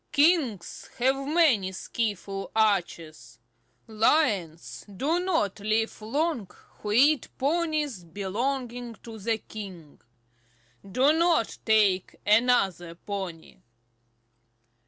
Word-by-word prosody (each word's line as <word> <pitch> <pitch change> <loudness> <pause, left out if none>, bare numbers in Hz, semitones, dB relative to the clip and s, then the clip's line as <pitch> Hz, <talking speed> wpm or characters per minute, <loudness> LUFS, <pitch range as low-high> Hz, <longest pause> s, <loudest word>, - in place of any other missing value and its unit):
Kings 290 - +1
have 260 +2 +2
many 290 - +3
skilful 195 -1 -4
archers. 165 - -1 0.5
Lions 210 - 0
do 315 - +1
not 320 - 0
live 215 +2 -1
long 245 - -1 0.3
who 210 - -4
eat 275 +5 +4
ponies 300 - -1
belonging 235 +7 -4
to 225 -1 -9
the 225 +2 0
king. 190 -9 -10 0.8
Do 255 +10 +2
not 330 -7 +2
take 205 -4 +2
another 205 -6 +2
pony." 185 -3 -7
220 Hz, 90 wpm, -27 LUFS, 195-275 Hz, 0.8 s, eat